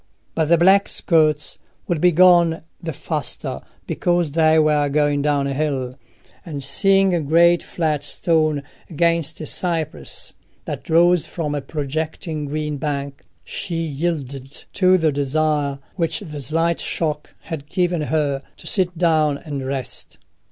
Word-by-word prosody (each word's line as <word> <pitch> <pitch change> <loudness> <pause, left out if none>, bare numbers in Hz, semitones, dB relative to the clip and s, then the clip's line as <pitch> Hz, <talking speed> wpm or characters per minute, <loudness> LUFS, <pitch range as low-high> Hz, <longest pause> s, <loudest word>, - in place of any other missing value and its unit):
But 160 - +1
the 170 +2 +4
black 195 +4 +5
skirts 155 -3 +1 0.3
would 170 -3 -1
be 180 - +5
gone 170 -1 +5 0.2
the 165 - -4
faster 150 -2 -4 0.2
because 175 -3 0
they 160 +1 +4
were 150 -2 +3
going 145 0 +1
down 145 -1 +1
hill; 135 -2 -2 0.5
and 145 -5 -6
seeing 195 +6 +3
a 170 - +1
great 170 +4 +4
flat 155 -4 -2
stone 155 -1 0 0.3
against 170 -2 +1
a - - -4
cypress 160 - -2 0.3
that - - -6
rose 175 +1 +4
from 155 -4 -3
a 145 - -2
projecting 155 +2 -4
green 150 0 -3
bank, 140 -1 -4 0.2
she 175 -4 -5
yielded 145 -4 -3 0.2
to 185 -1 +4
the 160 -3 +2
desire 145 0 0 0.2
which 165 -3 0
the 150 -7 -7
slight 165 +5 +1
shock 150 -3 -3
had 150 -3 -7
given 175 -1 0
her, 145 -1 0 0.2
to - - -14
sit 180 -3 0
down 155 -4 +2
and 145 -3 -6
rest. 135 -3 -4
155 Hz, 140 wpm, -21 LUFS, 145-170 Hz, 0.5 s, black